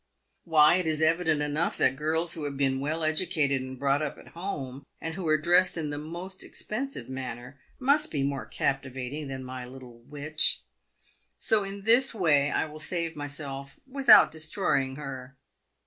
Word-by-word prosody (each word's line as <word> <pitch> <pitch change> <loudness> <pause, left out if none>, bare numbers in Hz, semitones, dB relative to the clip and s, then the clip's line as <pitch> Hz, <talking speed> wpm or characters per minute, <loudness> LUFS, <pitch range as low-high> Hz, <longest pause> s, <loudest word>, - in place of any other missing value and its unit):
Why, 160 0 +5
it 180 -3 -2
is 155 -1 0
evident 160 -2 +1
enough 150 +3 -1
that 130 0 +2
girls 160 +3 +1
who 155 -3 -3
have 140 -1 -5
been 135 -1 0
well 155 +4 -3
educated 155 -4 0
and 130 0 -8
brought 140 +2 +1
up 150 -1 -3
at - - -15
home, 140 -7 -6 0.2
and 165 0 -5
who 175 -1 -5
are 155 0 +3
dressed 175 +3 +3
in 155 -3 -3
the 145 - -4
most 175 +5 -8
expensive 245 - -3
manner, 130 0 -7 0.2
must 285 +3 +2
be 140 -3 -2
more 140 0 -3
captivating 135 +2 -3
than 135 -1 -6
my 130 0 -7
little 125 -2 -13
witch. 145 - +2 0.7
So 215 -2 +4
in 195 0 -8
this 240 +3 +5
way 150 -7 +2
I - - 0
will 155 0 -11
save 165 0 0
myself 140 -2 -5
without 270 0 +6
destroying 155 -4 0
her. 135 -2 -8
150 Hz, 170 wpm, -27 LUFS, 135-170 Hz, 0.7 s, without